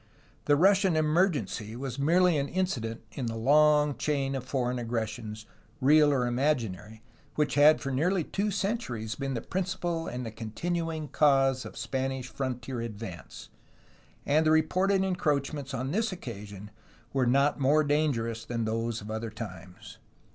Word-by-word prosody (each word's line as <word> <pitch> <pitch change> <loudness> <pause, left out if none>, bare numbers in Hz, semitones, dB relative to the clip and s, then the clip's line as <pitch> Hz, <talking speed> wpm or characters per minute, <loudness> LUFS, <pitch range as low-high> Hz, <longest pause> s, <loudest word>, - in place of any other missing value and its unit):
The 145 - +4
Russian 190 +2 +4
emergency 155 - 0
was 130 +1 -5
merely 175 +4 +4
an 140 -1 0
incident 120 -13 -2
in 120 +3 -4
the 115 - -3
long 150 +4 +4
chain 140 -2 -1
of 135 -2 -3
foreign 125 -1 -1
aggressions, 110 -2 -4 0.3
real 150 +2 +5
or 130 -3 +1
imaginary, 115 - -1 0.3
which 150 -1 +1
had 150 +2 +6
for 135 - -4
nearly 170 +7 +1
two 200 +6 -2
centuries 195 - -2
been 135 0 -3
the 115 - -4
principal 175 -3 -2
and 125 0 -4
the 115 - -5
continuing 160 +8 -3
cause 135 -2 +3
of - - -9
Spanish 130 -1 -3
frontier 125 0 -4
advance, 105 -6 -8 0.8
and 150 +2 +3
the 155 - +3
reported 185 +5 +2
en 190 -1 0
croachments 145 -3 -1
on 130 0 -3
this 220 +5 0
occasion 105 - -8 0.4
were 130 -2 +2
not 140 +4 +3
more 145 +3 +4
dangerous 140 -7 0
than 115 -2 -3
those 115 +1 -2
of 105 +2 -7
other 110 +1 -3
times. 90 -5 -10
135 Hz, 150 wpm, -28 LUFS, 115-155 Hz, 0.8 s, had